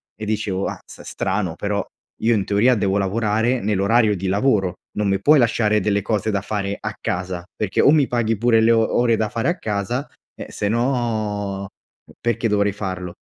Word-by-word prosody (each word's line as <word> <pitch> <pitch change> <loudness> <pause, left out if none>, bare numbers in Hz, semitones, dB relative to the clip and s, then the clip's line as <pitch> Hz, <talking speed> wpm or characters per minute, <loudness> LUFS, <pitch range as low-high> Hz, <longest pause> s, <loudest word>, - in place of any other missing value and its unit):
e 110 - -7
dicevo: 105 -3 -1
"Azz, - - -9
strano 95 -6 -2
però, 100 +2 -2 0.4
io 115 +1 +3
in 100 -3 0
teoria 110 +5 +3
devo 100 -2 0
lavorare 110 +5 0
nell'orario 105 +2 +2
di 95 +1 -4
lavoro, 100 -3 +1 0.2
non 105 -1 +1
mi 95 0 +1
puoi 150 +6 +5
lasciare 110 -3 +2
delle 100 0 +1
cose 105 0 -1
da 100 - -1
fare 100 -1 -3
a - - -4
casa, 90 -1 -3
perché 105 -3 0
o - - +5
mi 150 -2 +4
paghi 115 -3 0
pure 115 0 +3
le 115 +1 +4
o 115 -1 +2
ore 120 -1 +3
da 110 - 0
fare 115 +1 -2
a 175 - -1
casa, 110 - -3 0.3
eh, - - -8
sennò 110 -4 -1 0.6
perché 115 0 0
dovrei 105 -1 +2
farlo?" 95 -3 -5
105 Hz, 180 wpm, -21 LUFS, 100-115 Hz, 0.6 s, puoi